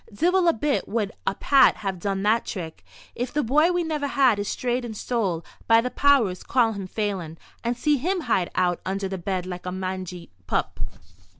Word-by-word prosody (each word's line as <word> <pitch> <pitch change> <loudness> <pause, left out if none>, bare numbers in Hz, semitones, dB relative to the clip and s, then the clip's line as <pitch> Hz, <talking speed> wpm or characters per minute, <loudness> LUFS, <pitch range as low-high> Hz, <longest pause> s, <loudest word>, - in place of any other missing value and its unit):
"Divil 350 - +2
a 335 - +5
bit 285 +5 -1
would 215 -3 -1 0.2
a - - +1
Pat 275 +6 +5
have 195 -3 -4
done 195 +1 -2
that 220 +3 +3
trick. 165 -5 -6 0.3
If 245 +1 -3
the 295 - 0
bye 300 +8 +4
we 355 -1 +1
never 305 -3 -2
had 265 -6 +3
is 205 - -2
strayed 245 0 -1
and 220 -3 -6
stole, 195 -10 -1 0.2
by 225 0 +6
the 250 +2 -1
powers, 255 -11 +3
call 240 -3 +2
him 195 -2 -5
Phelan, 185 -6 -3 0.3
and 235 0 -1
see 295 +3 +2
him 355 +7 -1
hide 185 - +1
out 180 -1 +1
under 195 +1 -2
the 190 -1 -5
bed 185 0 -2
like 180 0 -6
a - - -2
mangy 185 - -5 0.2
pup." - - -1
215 Hz, 200 wpm, -25 LUFS, 185-270 Hz, 0.3 s, by